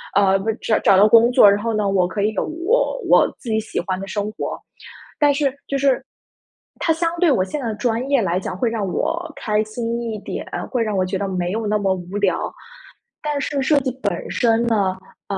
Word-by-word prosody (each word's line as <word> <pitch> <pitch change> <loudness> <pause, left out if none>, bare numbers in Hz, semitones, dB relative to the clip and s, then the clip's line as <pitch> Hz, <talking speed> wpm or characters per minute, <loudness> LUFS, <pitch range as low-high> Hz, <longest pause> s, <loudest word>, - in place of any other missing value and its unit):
呃， 195 -1 +4
不 220 +3 -3
是 220 - -1 0.3
找 195 - +6
到 205 +2 +7
工 230 +2 +6
作。 205 - +7
然 205 +2 0
后 230 -1 -1
呢， 210 -2 0
我 185 -2 +2
可 200 +2 -3
以 215 +2 +1
有 - - -1
我 370 +10 0
我 - - +5
自 240 - -8
己 220 0 +1
喜 220 - -4
欢 185 -1 -3
的 195 - -6
生 205 +1 -3
活。 - - -5 0.6
但 290 -1 +5
是 280 -2 0
就 275 - -1
是 275 -1 +1 0.7
它 325 - +2
相 335 +1 0
对 350 -3 +4
我 185 - +2
现 290 +10 -4
在 245 - -4
的 220 - -2
专 235 +3 -1
业 275 -4 +3
来 180 -1 0
讲， 185 - -5
会 230 +5 0
让 215 -4 -2
我 330 - -2
开 210 -1 0
心 230 +2 -4
一 230 -2 -4
点， - - -6 0.3
会 245 -3 +1
让 215 -2 -2
我 185 - +2
觉 190 +1 -2
得 200 +1 -2
没 180 -1 -2
有 220 +1 -2
那 210 0 +1
么 195 -2 +1
无 180 +2 -6
聊。 200 -2 0 2.8
但 195 - -2
215 Hz, 225 characters per minute, -21 LUFS, 195-250 Hz, 2.8 s, 到